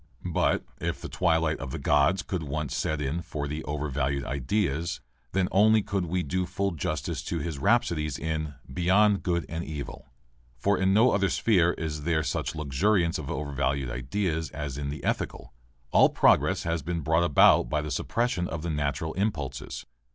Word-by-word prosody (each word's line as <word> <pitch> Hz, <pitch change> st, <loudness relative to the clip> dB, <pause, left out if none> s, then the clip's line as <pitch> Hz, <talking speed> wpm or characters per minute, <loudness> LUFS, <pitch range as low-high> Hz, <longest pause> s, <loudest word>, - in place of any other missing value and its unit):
But -, -, +1 dB
if -, -, -2 dB
the -, -, -7 dB
twilight 80 Hz, -3 st, +1 dB
of 65 Hz, -2 st, -5 dB
Gods 90 Hz, +7 st, +3 dB
could 90 Hz, -3 st, -3 dB
once 75 Hz, -1 st, -3 dB
set 75 Hz, -, -1 dB
in 75 Hz, +4 st, -2 dB
for 75 Hz, -3 st, -4 dB
the 75 Hz, +2 st, -4 dB
overvalued 70 Hz, -2 st, -1 dB
ideas 80 Hz, -, -1 dB, 0.3 s
then 95 Hz, -1 st, +1 dB
only 110 Hz, +2 st, +5 dB
could 95 Hz, -3 st, -2 dB
we 90 Hz, +2 st, -1 dB
do 90 Hz, +5 st, -1 dB
full 100 Hz, +2 st, -1 dB
justice 80 Hz, -5 st, -3 dB
to 85 Hz, -, -2 dB
his 80 Hz, -2 st, -4 dB
rhapsodies 75 Hz, -, +1 dB
in 80 Hz, -2 st, -3 dB, 0.2 s
"Beyond 100 Hz, +5 st, +3 dB
Good 85 Hz, -3 st, 0 dB
and 80 Hz, +1 st, -4 dB
Evil." 75 Hz, -4 st, -7 dB, 0.5 s
For 100 Hz, +11 st, +2 dB
in 95 Hz, 0 st, +2 dB
no 115 Hz, +6 st, +5 dB
other 100 Hz, -1 st, +2 dB
sphere 90 Hz, -4 st, +3 dB
is 75 Hz, -2 st, -4 dB
there 80 Hz, 0 st, +1 dB
such -, -, -2 dB
luxuriance 85 Hz, +5 st, +1 dB
of 75 Hz, -, -6 dB
overvalued 70 Hz, -2 st, -1 dB
ideas 80 Hz, +6 st, -2 dB
as 75 Hz, -3 st, -5 dB
in 70 Hz, 0 st, -3 dB
the 75 Hz, -, -6 dB
ethical. -, -, -3 dB, 0.4 s
All -, -, +6 dB
progress -, -, +3 dB
has 85 Hz, -1 st, -1 dB
been 85 Hz, +3 st, -3 dB
brought 80 Hz, +3 st, +2 dB
about 75 Hz, -5 st, +5 dB
by 75 Hz, -1 st, 0 dB
the 75 Hz, -, -5 dB
suppression 115 Hz, -, -1 dB
of 75 Hz, 0 st, -5 dB
the 85 Hz, -, -2 dB
natural 75 Hz, +1 st, -2 dB
impulses. 90 Hz, -9 st, -3 dB
80 Hz, 175 wpm, -27 LUFS, 70-90 Hz, 0.5 s, All